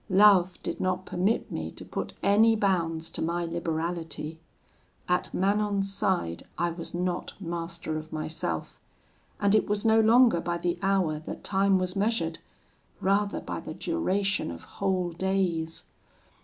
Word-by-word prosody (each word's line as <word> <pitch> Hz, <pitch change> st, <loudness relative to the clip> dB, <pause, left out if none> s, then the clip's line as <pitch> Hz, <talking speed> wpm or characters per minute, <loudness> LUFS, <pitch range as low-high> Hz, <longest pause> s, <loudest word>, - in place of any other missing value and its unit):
Love 190 Hz, -2 st, +6 dB
did -, -, -3 dB
not 185 Hz, 0 st, 0 dB
permit 195 Hz, +6 st, 0 dB
me -, -, -3 dB
to -, -, -11 dB
put -, -, -4 dB
any 220 Hz, +3 st, +5 dB
bounds 170 Hz, -6 st, 0 dB
to -, -, -5 dB
my 170 Hz, +1 st, 0 dB
liberality. 165 Hz, -1 st, -3 dB, 0.7 s
At 180 Hz, 0 st, +1 dB
Manon's 200 Hz, 0 st, +1 dB
side 175 Hz, -, 0 dB, 0.2 s
I 175 Hz, 0 st, +1 dB
was 170 Hz, 0 st, -7 dB
not 180 Hz, +2 st, -2 dB
master 170 Hz, -3 st, -4 dB
of 155 Hz, 0 st, -11 dB
myself; 155 Hz, -, -4 dB, 0.6 s
and 200 Hz, 0 st, +3 dB
it 215 Hz, -, +4 dB
was 205 Hz, +1 st, 0 dB
no 220 Hz, 0 st, +5 dB
longer 225 Hz, -4 st, +5 dB
by 170 Hz, 0 st, -1 dB
the 175 Hz, 0 st, -1 dB
hour 190 Hz, -6 st, +1 dB
that -, -, -6 dB
time 195 Hz, 0 st, +3 dB
was 185 Hz, 0 st, -2 dB
measured; 195 Hz, -5 st, 0 dB, 0.6 s
rather 200 Hz, +1 st, +1 dB
by -, -, -5 dB
the -, -, -7 dB
duration 205 Hz, -, 0 dB
of 85 Hz, 0 st, -8 dB
whole 185 Hz, -3 st, -1 dB
days. 175 Hz, -3 st, -1 dB
185 Hz, 145 wpm, -28 LUFS, 165-200 Hz, 0.7 s, Love